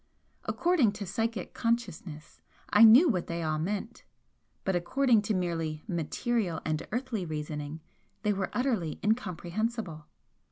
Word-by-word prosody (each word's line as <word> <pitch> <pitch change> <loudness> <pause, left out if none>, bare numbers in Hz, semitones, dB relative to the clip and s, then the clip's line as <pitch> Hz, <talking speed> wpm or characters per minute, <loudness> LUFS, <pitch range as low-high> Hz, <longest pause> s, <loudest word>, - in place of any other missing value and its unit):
According 325 - +2
to 205 -1 -5
psychic 220 +1 -2
consciousness 190 -10 -3 0.3
I 210 - +7
knew 235 +10 +9
what 185 - 0
they 170 0 -3
all 155 -1 0
meant, 205 +7 -3 0.6
but 190 - 0
according 230 +6 +3
to 210 0 -1
merely 165 -4 -2
material 180 +1 -1
and 155 -1 0
earthly 240 -4 -2
reasoning 150 -1 -5 0.4
they 210 - +2
were 190 -1 -2
utterly 230 - -1
incomprehensible. 205 -4 -2
195 Hz, 125 wpm, -29 LUFS, 165-230 Hz, 0.6 s, knew